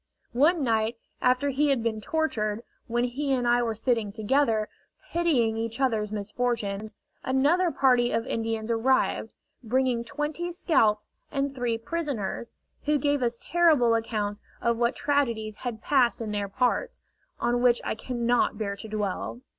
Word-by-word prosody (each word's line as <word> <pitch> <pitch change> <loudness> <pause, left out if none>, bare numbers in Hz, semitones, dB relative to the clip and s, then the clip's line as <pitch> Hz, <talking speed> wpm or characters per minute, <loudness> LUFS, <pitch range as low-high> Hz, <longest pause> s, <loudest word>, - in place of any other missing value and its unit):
One 300 +6 +3
night 225 -1 +1 0.2
after 255 +3 +2
he 290 +2 +2
had 265 -5 +1
been 220 -2 -1
tortured, 225 -7 -1 0.2
when 240 0 0
he 270 +3 -2
and 245 -2 0
I 240 0 +4
were 230 -2 -1
sitting 225 -2 0
together, 220 0 +1 0.4
pitying 265 -11 +2
each 230 +2 -3
other's 220 -6 +1
misfortunes, 215 -1 -2 0.3
another 295 +8 +3
party 250 -5 +3
of 230 - 0
Indians 225 0 -2
arrived, 250 +3 +1 0.3
bringing 245 0 +1
twenty 300 +8 -3
scalps 225 - +1 0.2
and 275 0 -1
three 245 -3 -1
prisoners, 235 - -3 0.3
who 300 0 +3
gave 285 0 +1
us 235 -1 0
terrible 310 -9 +3
accounts 215 -2 -2 0.2
of 235 -1 +1
what 235 +2 +1
tragedies 235 -7 0
had 235 -3 -5
passed 255 -4 +3
in 225 -2 -4
their 205 -1 -1
parts, 255 - 0 0.4
on 240 0 +1
which 245 -1 +4
I - - -1
cannot 240 -1 0
bear 200 -2 -2
to 220 - -8
dwell. 210 +2 -3
240 Hz, 150 wpm, -27 LUFS, 220-270 Hz, 0.4 s, I